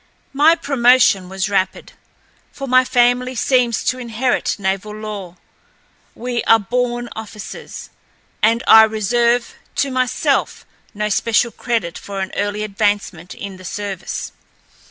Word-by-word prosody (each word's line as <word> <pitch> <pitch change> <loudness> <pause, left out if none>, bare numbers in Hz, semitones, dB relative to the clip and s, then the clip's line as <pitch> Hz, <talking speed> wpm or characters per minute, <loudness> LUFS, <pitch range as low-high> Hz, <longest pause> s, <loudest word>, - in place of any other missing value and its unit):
My 300 +4 +5
promotion 250 - +3
was 190 +1 -2
rapid, 195 -2 -1 0.6
for 275 - -7
my 255 0 +5
family 250 0 +2
seems 245 -1 +1
to 255 - -1
inherit 245 +1 -1
naval 200 +1 -3
lore. 205 -5 -7 0.8
We 240 0 -3
are 225 - +6
born 240 +2 -2
officers, 215 -1 -9 0.5
and 230 +3 +3
I 220 - +9
reserve 235 +3 +1 0.2
to 275 - 0
myself 255 -1 0 0.3
no 210 +1 -1
special 230 +3 +1
credit 225 -10 -3
for 200 -1 -7
an 190 0 -3
early 205 +1 -2
advancement 205 -4 -2
in 200 -2 -8
the 185 - -13
service. 195 -1 -5
220 Hz, 125 wpm, -19 LUFS, 200-245 Hz, 0.8 s, I